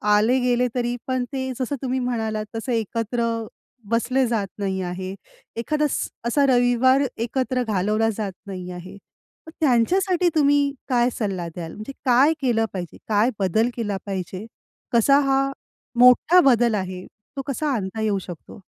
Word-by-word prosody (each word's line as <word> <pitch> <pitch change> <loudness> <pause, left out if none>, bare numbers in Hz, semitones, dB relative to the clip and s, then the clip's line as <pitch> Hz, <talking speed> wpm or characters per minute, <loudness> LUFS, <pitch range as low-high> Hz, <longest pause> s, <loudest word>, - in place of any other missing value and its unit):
आले 235 +5 +3
गेले 250 0 +2
तरी 240 -1 0
पण 255 -1 0
ते 260 -1 -2
जसं 255 +3 -1
तुम्ही 260 0 -1
म्हणालात 220 -3 -2
तसं 225 +3 -3
एकत्र 230 +1 -1 0.7
बसले 250 +3 +2
जात 220 -4 -1
नाही 190 -1 -1
आहे. 185 +1 -4 0.4
एखादा 300 +6 0
स्स-असा 255 +4 -1
रविवार 250 +1 +4 0.2
एकत्र 250 +2 -1
घालवला 215 +1 +1
जात 205 -3 -2 0.2
नाही 185 -2 -6
आहे. 180 +2 -9 0.5
मग 320 - -9
त्यांच्यासाठी 350 - +3
तुम्ही 285 -1 +3 0.2
काय 245 -1 +3
सल्ला 190 -6 -2
द्याल. 165 -2 -6
म्हणजे 215 +5 -7
काय 260 +5 +5
केलं 230 -4 +2
पाहिजे? 175 -3 -6
काय 215 +3 +3
बदल 210 +5 +2
केला 210 -4 -2
पाहिजे? 190 +1 -5 0.5
कसा 275 +5 +5
हा 275 0 +2 0.5
मोठा 250 +8 +7
बदल 235 -2 +3
आहे 185 -2 -4 0.3
तो - - -1
कसा 285 +1 -1
आणता 210 0 -3
येऊ 210 -2 +1
शकतो? 175 +3 -10
235 Hz, 145 wpm, -23 LUFS, 205-260 Hz, 0.7 s, मोठा